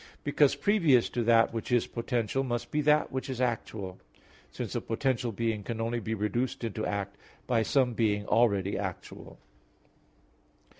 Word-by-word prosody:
Because, 145 Hz, -1 st, +3 dB
previous 165 Hz, -, +3 dB
to 120 Hz, -, -2 dB
that 115 Hz, 0 st, +4 dB
which 115 Hz, +2 st, -4 dB
is 120 Hz, -1 st, +3 dB
potential, 120 Hz, +1 st, -1 dB
must 120 Hz, -2 st, -3 dB
be 150 Hz, -, +1 dB
that 150 Hz, 0 st, +3 dB
which 130 Hz, +1 st, -4 dB
is 130 Hz, -2 st, -4 dB
actual; 110 Hz, -6 st, -3 dB, 0.5 s
since -, -, -5 dB
a -, -, -1 dB
potential 125 Hz, 0 st, -1 dB
being 110 Hz, 0 st, -1 dB
can 115 Hz, +2 st, -5 dB
only 115 Hz, +1 st, -1 dB
be 110 Hz, 0 st, -3 dB
reduced 120 Hz, +5 st, -2 dB
into 110 Hz, -1 st, -2 dB
act 100 Hz, -1 st, -3 dB, 0.3 s
by 120 Hz, -3 st, +2 dB
some 125 Hz, +2 st, +2 dB
being 105 Hz, -3 st, +1 dB
already 100 Hz, -5 st, +2 dB
actual. 95 Hz, -3 st, -7 dB
115 Hz, 155 wpm, -29 LUFS, 110-130 Hz, 0.5 s, that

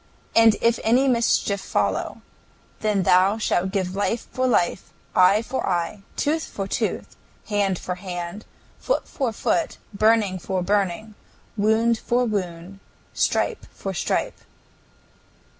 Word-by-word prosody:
And 225 Hz, -1 st, +6 dB
if 230 Hz, 0 st, +3 dB
any 250 Hz, +5 st, +3 dB
mischief 230 Hz, -5 st, +2 dB
follow, -, -, -1 dB, 0.6 s
then 210 Hz, -3 st, +1 dB
thou 185 Hz, +5 st, +4 dB
shalt 190 Hz, -4 st, 0 dB
give 190 Hz, -2 st, -2 dB
life 210 Hz, +3 st, -1 dB
for 255 Hz, 0 st, 0 dB
life, 175 Hz, -6 st, 0 dB, 0.2 s
eye 195 Hz, +4 st, +5 dB
for 260 Hz, +3 st, -3 dB
eye, 175 Hz, +2 st, -1 dB
tooth 315 Hz, +2 st, 0 dB
for 195 Hz, -1 st, -5 dB
tooth, -, -, -3 dB, 0.3 s
hand 200 Hz, -3 st, +1 dB
for 180 Hz, -, -4 dB
hand, 180 Hz, +2 st, -6 dB, 0.4 s
foot -, -, -1 dB
for 265 Hz, -5 st, -2 dB
foot, -, -, -1 dB, 0.2 s
burning 210 Hz, -2 st, +2 dB
for 185 Hz, +1 st, -2 dB
burning, 205 Hz, +2 st, -1 dB, 0.4 s
wound 220 Hz, +2 st, +2 dB
for 245 Hz, +1 st, +1 dB
wound, 185 Hz, -3 st, -4 dB, 0.3 s
stripe -, -, 0 dB
for 195 Hz, -, -5 dB
stripe." 175 Hz, -, -2 dB
205 Hz, 125 wpm, -23 LUFS, 185-225 Hz, 0.6 s, And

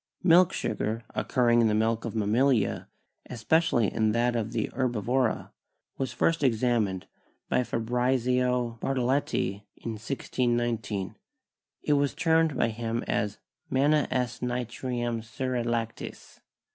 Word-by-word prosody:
Milk 180 Hz, 0 st, +6 dB
sugar, 110 Hz, +2 st, -2 dB
occurring 120 Hz, -2 st, +2 dB
in 115 Hz, -, +4 dB
the 105 Hz, -, +2 dB
milk 110 Hz, +1 st, +1 dB
of 115 Hz, -, -5 dB
mammalia, 110 Hz, +1 st, +1 dB, 0.4 s
espe 125 Hz, +7 st, +2 dB
cially 120 Hz, -9 st, +1 dB
in 110 Hz, -1 st, +1 dB
that 120 Hz, +1 st, +1 dB
of 115 Hz, -1 st, -2 dB
the 110 Hz, -, -2 dB
herbivora, 125 Hz, -1 st, 0 dB, 0.5 s
was 135 Hz, -2 st, -1 dB
first 165 Hz, -1 st, +1 dB
examined 115 Hz, -6 st, +1 dB, 0.4 s
by 125 Hz, -, +2 dB
Fabrizio 125 Hz, 0 st, 0 dB
Bartoletti 130 Hz, -6 st, 0 dB, 0.2 s
in 115 Hz, -, -5 dB
1619; 120 Hz, -3 st, -2 dB, 0.7 s
it 150 Hz, -, +2 dB
was 145 Hz, -1 st, +1 dB
termed 160 Hz, -3 st, +2 dB
by 115 Hz, -, +2 dB
him 115 Hz, +1 st, -3 dB, 0.7 s
"manna 145 Hz, +3 st, +3 dB
s. 125 Hz, -3 st, -1 dB
nitrum 120 Hz, -1 st, -2 dB
seri 130 Hz, +1 st, -2 dB
lactis." 115 Hz, -1 st, -4 dB
120 Hz, 120 wpm, -28 LUFS, 115-130 Hz, 0.7 s, Milk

